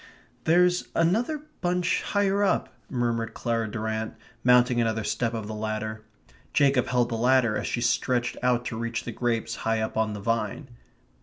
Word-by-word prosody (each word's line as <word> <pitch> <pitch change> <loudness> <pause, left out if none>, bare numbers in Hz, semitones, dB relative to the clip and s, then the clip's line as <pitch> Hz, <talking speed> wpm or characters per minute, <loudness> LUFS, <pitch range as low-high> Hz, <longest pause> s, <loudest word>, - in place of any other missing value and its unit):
"There's 180 +2 +3
another 230 - +1 0.2
bunch 180 -1 +1
higher 200 0 +1
up," 200 - +1 0.2
murmured 120 -3 -1
Clara 115 -2 -1
Durrant, 110 0 -3 0.3
mounting 125 -1 +5
another 110 -1 0
step 115 +2 -1
of 110 -2 -4
the 110 - -5
ladder. 110 0 -4 0.5
Jacob 135 -3 +3
held 125 -1 +1
the 115 - -2
ladder 120 -1 +3
as - - -2
she 120 - -2
stretched 120 +1 +1
out 125 -1 +1
to 115 - -4
reach 115 0 -3
the 120 - -5
grapes 115 0 -1
high 110 0 0
up 110 0 -3
on 110 -1 +1
the 105 - -5
vine. 115 +5 -2
120 Hz, 165 wpm, -26 LUFS, 110-130 Hz, 0.5 s, mounting